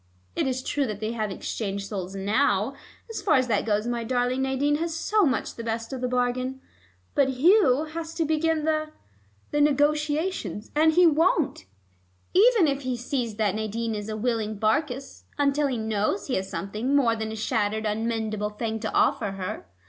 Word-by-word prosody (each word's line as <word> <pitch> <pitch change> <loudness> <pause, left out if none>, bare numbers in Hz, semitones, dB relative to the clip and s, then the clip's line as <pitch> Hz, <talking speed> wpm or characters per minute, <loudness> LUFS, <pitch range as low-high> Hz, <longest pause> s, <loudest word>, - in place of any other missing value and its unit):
It - - 0
is 255 0 -2
true 285 -1 0
that 210 -2 -4
they 215 +1 -2
have 220 -2 -2
exchanged 200 0 -4
souls 195 -2 -5
now 205 +3 +1 0.4
as 450 - -4
far 315 - +3
as 255 -2 +3
that 215 0 +1
goes 210 0 +1
my 240 -1 -2
darling 250 +2 0
Nadine 270 +2 +1
has 330 +1 -2
so 410 +2 +2
much 260 - -1
the 230 - -7
best 225 +2 -3
of 260 - -5
the 250 - 0
bargain 250 +1 -1 0.5
but 275 -1 +3
Hugh 310 - +5
has 325 +1 -6
to 330 -1 0
begin 315 0 +1
the 310 -1 0 0.6
the 295 - +2
negotiations, 300 - 0
and 315 +1 +4
he 355 +2 +6
won't, 320 - +2 0.7
even 425 -2 +5
if 275 -1 0
he 255 -2 -2
sees 245 -2 -2
that 210 -3 +1
Nadine 220 +2 -2
is 210 0 -5
a 215 - -3
willing 220 -2 -1
Barkis, 250 +5 -1
until 285 0 +2
he 260 -3 -2
knows 220 - -1
he 265 - -3
has 190 -3 -1
something 215 +8 -2
more 240 -5 +3
than 220 -1 -4
a - - -5
shattered 220 -1 -1
unmendable 215 -1 -1
thing 220 -1 -2
to 220 0 -3
offer 200 - +2
her. 185 - -5
250 Hz, 185 wpm, -26 LUFS, 220-295 Hz, 0.7 s, he